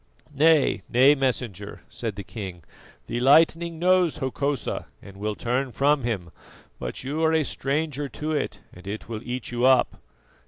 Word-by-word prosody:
"Nay, 155 +1 +4
nay, 130 +4 +6
Messenger," 125 -7 -2
said 115 -4 -5
the 100 - -6
king, 95 -5 -7 0.4
"the 120 - -3
lightning 165 +5 +4
knows 180 -1 +3
Hokosa 140 -1 -2
and 100 -1 -13
will 105 +1 -3
turn 125 +4 -1
from 145 +3 +2
him, 95 -8 -3 0.5
but - - -5
you 150 +5 -2
are 160 0 +3
a 160 -1 +3
stranger 145 +1 -2
to 150 +5 -4
it 155 - -2
and 90 +2 -13
it 105 +2 -5
will 110 -1 -5
eat 125 -1 -4
you 120 0 -2
up." 130 -1 +3
130 Hz, 160 wpm, -25 LUFS, 110-150 Hz, 0.5 s, nay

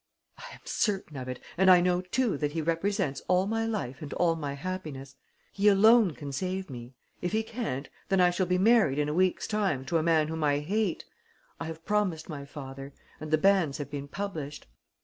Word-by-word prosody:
"I - - -10
am - - -18
certain 195 -8 -1
of 130 -1 -6
it 125 - -5 0.2
and 190 0 +6
I 180 -1 +9
know 180 0 +2
too 230 +4 0
that 145 0 -2
he 165 - -1
represents 165 -2 -1
all 185 +1 +3
my 225 +2 -1
life 165 - -3
and 145 -2 -7
all 170 -2 +2
my 145 -3 -4
happiness. 145 -5 -6 0.4
He 200 +1 +1
alone 210 - +6
can 145 -2 -7
save 185 +4 -3
me. 120 0 -9 0.3
If 180 +3 -2
he 220 +1 +1
can't, 220 - -4 0.2
then 195 - +3
I 180 -1 +5
shall 180 +1 0
be 180 0 +2
married 195 - +4
in 150 0 +1
a - - -1
week's 185 +2 +1
time 195 -11 -1
to 165 +5 +1
a - - 0
man 160 -1 +3
whom 160 0 -3
I 145 -1 +3
hate. 190 +5 -1 0.5
I 165 - -4
have 160 0 -8
promised 190 -7 0
my 145 -3 -6
father; 135 -1 -9 0.2
and 155 - -7
the 155 - +4
banns 175 -5 +3
have 145 -2 -6
been 140 -1 -5
published." 155 -5 -5
165 Hz, 210 wpm, -28 LUFS, 145-195 Hz, 0.5 s, I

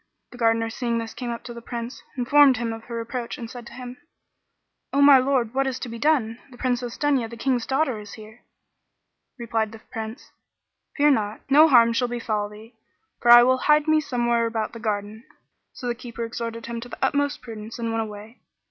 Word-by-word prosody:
The 245 - -12
Gardener 225 -1 +2
seeing 235 -1 -2
this 225 -1 -4
came 245 -2 -5
up 235 0 -5
to 240 - -8
the 235 - -9
Prince, 235 +1 -6 0.2
informed 270 +1 +5
him 230 -1 -2
of 225 0 -9
her 235 -1 -5
approach 235 +1 -5
and 230 - -6
said 240 0 -10
to - - -12
him, 250 0 -8 0.9
"O 280 - 0
my 280 -1 +8
lord, 255 -3 0
what 270 +1 +1
is 260 -1 -2
to 250 - -6
be 230 0 -7
done? 245 -6 +1
The 245 - -15
Princess 245 -1 -2
Dunya, 275 -6 +1
the 235 - -9
King's 245 -1 0
daughter, 265 -4 0
is 210 -1 -10
here." 220 +1 -13 1.0
Replied 225 -2 -2
the - - -9
Prince, 225 +5 -7 0.7
"Fear 295 0 +5
not, 215 -4 -1
no 305 +3 +8
harm 235 -5 +6
shall 245 +1 +1
befal 225 -4 -2
thee; 215 +3 -14 0.5
for 240 - +1
I 240 0 +10
will 255 +1 +3
hide 300 +2 +3
me 310 0 +4
somewhere 240 -4 0
about 225 -1 -3
the 230 - -8
garden." 215 0 -3 0.5
So - - -10
the 240 - 0
Keeper 235 -1 -6
exhorted 230 0 -5
him 235 0 -5
to 245 - -9
the - - -8
utmost 285 -1 -1
prudence 225 -2 -8
and 230 -1 -3
went 225 - 0
away. 215 +2 -9
235 Hz, 210 wpm, -24 LUFS, 225-255 Hz, 1.0 s, I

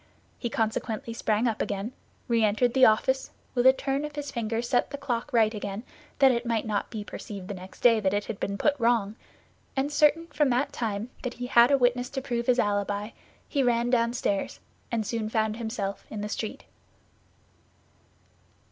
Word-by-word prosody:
He 235 - -2
consequently 225 0 -2
sprang 225 +1 +1
up 220 -2 -1
again, 200 +3 -2 0.4
re 230 -2 +2
entered 220 +3 +2
the 260 -1 +7
office, 260 +5 +2 0.2
with 245 0 +4
a - - +10
turn 275 +1 -2
of 300 -1 -6
his 290 -1 -4
finger 230 -3 -2
set 245 +1 +1
the 285 - -5
clock 280 -1 -3
right 225 -3 +3
again, 205 0 -5 0.3
that 270 -2 +6
it 235 -1 0
might 230 -2 -1
not 210 -2 -1
be 215 -3 -5
perceived 200 -2 -8
the 205 - -4
next 185 0 -11
day 230 -2 +6
that 195 -3 +1
it 205 +1 -1
had 215 - -5
been 200 0 -2
put 295 - +3
wrong, 230 -3 +2 0.6
and 280 +2 0
certain 300 +2 +4
from 295 -4 +1
that 250 +3 +1
time 220 0 -3
that 250 -2 -4
he 245 - -5
had 240 -1 +6
a 280 - +5
witness 245 -1 +2
to 275 - -3
prove 240 -3 -3
his 250 -1 +4
alibi, 205 0 0 0.4
he 280 - 0
ran 240 -1 +2
downstairs 230 -4 0 0.3
and 225 -2 0
soon 220 0 -2
found 220 -1 0
himself 220 -4 -4
in 215 - -5
the 210 - -4
street. 215 0 -4
235 Hz, 190 wpm, -27 LUFS, 215-250 Hz, 0.6 s, a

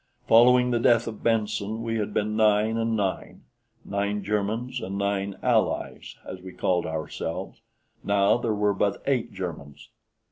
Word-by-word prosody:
Following 125 +2 +6
the 120 - +1
death 115 0 +4
of 110 -2 -7
Benson 110 -1 -1
we 115 0 -2
had 105 0 -2
been 105 +1 -1
nine 110 0 +3
and 115 0 0
nine 95 -2 -3 0.4
nine 100 +1 -2
Germans 110 +5 -2
and 95 +1 -4
nine 100 0 -1
"Allies," - - 0
as 95 0 -8
we 95 0 -10
called 90 -2 0
ourselves, 80 +1 -5 0.4
now 100 +1 +3
there 115 -3 -1
were 105 0 +2
but 100 +1 -1
eight 120 -4 0
Germans. 85 -7 -7
105 Hz, 150 wpm, -26 LUFS, 100-115 Hz, 0.4 s, Following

